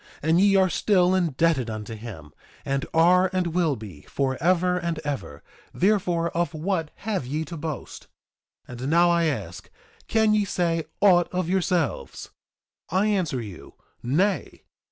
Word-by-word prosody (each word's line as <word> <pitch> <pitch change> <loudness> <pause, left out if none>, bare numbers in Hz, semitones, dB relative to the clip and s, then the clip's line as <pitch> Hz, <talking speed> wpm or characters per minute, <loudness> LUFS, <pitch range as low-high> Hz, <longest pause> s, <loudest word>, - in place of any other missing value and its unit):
And 165 +4 +3
ye 200 0 +4
are 190 -1 +5
still 185 0 +2
indebted 165 -7 +1
unto 110 0 -6
him, 105 -10 -9 0.3
and 135 +2 -1
are, 180 +3 +4
and 185 -1 +1
will 165 -5 +1
be, 105 - -10
forever 175 +7 +1
and 170 -2 -2
ever; 90 - -5 0.3
therefore, 180 -4 +1
of 170 -1 -1
what 165 -1 -2 0.2
have 195 - -2
ye 155 +4 -2
to 170 - -8
boast? 155 -3 -6 0.6
2:25 125 0 -9
And 130 - -2
now 170 +2 +4
I 170 -1 +2
ask, 105 - -4 0.4
can 220 -1 +3
ye 210 -1 +3
say 170 -4 -1 0.2
aught 180 -4 +5
of 180 -2 -2
yourselves? 180 -5 -1 0.6
I 190 +5 +1
answer 180 - 0
you, 100 -6 -11 0.3
Nay. 180 +12 -1
165 Hz, 150 wpm, -25 LUFS, 135-185 Hz, 0.6 s, are